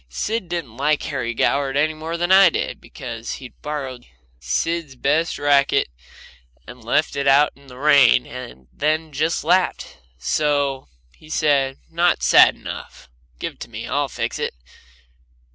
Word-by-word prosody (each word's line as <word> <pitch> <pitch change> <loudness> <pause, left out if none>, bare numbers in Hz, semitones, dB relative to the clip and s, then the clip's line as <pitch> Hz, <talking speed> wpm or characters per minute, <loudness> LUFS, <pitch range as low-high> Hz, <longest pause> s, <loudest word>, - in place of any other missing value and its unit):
Sid 205 - -3
didn't 155 -10 -5
like 150 +2 +1
Harry 125 -5 -3
Goward 140 +2 +1
any 155 +2 +2
more 160 +2 -5
than 175 +2 -1
I 190 -1 +8
did, - - -4
because 115 0 -7
he'd 130 -2 -11
borrowed 135 -4 -5 0.3
Sid's 145 - -2
best 150 +6 0
racket 140 - +2 0.8
and 125 -2 -12
left 150 +7 0
it 140 0 -1
out 140 +2 +5
in 140 0 -20
the 125 -1 -13
rain, 140 -4 +5
and 120 - -10
then 155 +1 -1
just 155 +4 -1
laughed. 185 0 0 0.2
So 140 - 0 0.3
he 155 - -18
said: 140 -4 +1
"Not 170 +1 +2
sad - - +6
enough. - - -9 0.3
Give - - -5
it - - -31
to - - -8
me. - - -7
I'll - - -1
fix - - -4
it." - - -3
145 Hz, 155 wpm, -21 LUFS, 130-155 Hz, 0.8 s, I